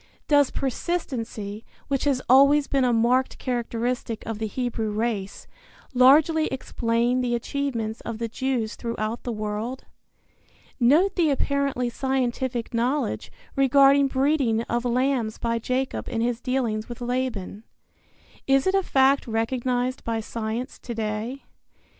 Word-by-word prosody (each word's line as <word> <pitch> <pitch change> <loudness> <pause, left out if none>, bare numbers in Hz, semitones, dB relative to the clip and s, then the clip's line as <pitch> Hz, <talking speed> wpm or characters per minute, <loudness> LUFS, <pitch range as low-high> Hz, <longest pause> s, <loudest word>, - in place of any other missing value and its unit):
Does 285 -2 +4
persistency, 235 - -3 0.2
which 275 -1 -1
has 270 -3 +1
always 280 +3 +6
been 275 -2 +1
a 250 - +3
marked 240 +3 +2
characteristic 240 -2 -3
of 225 -2 -4
the 220 - -1
Hebrew 230 -1 -2
race, 210 -2 -3 0.5
largely 300 +5 +5
explain 240 -1 0
the 240 -1 0
achievements 235 -3 -3
of 230 -1 -5
the 230 0 -2
Jews 240 -2 -2
throughout 230 -1 -3
the 245 - -4
world? 215 +4 -4 1.0
Note 300 +11 +4
the 335 -4 +3
apparently 280 -2 0
scientific 250 -1 -2
knowledge 250 +5 -1 0.2
regarding 275 +1 +5
breeding 265 -4 +1
of 240 +1 -2
lambs 245 -2 0
by 230 0 -1
Jacob 255 +3 -2
in 230 - -2
his 235 +1 -1
dealings 245 -5 -1
with 240 - -7
Laban. 240 -5 -3 0.8
Is 270 0 +3
it 380 - +2
a 390 - +3
fact 275 -5 +3
recognized 245 +3 -1
by 230 -1 -1
science 225 +3 -4
to 235 - -6
day? 220 +4 -3
245 Hz, 130 wpm, -25 LUFS, 230-270 Hz, 1.0 s, always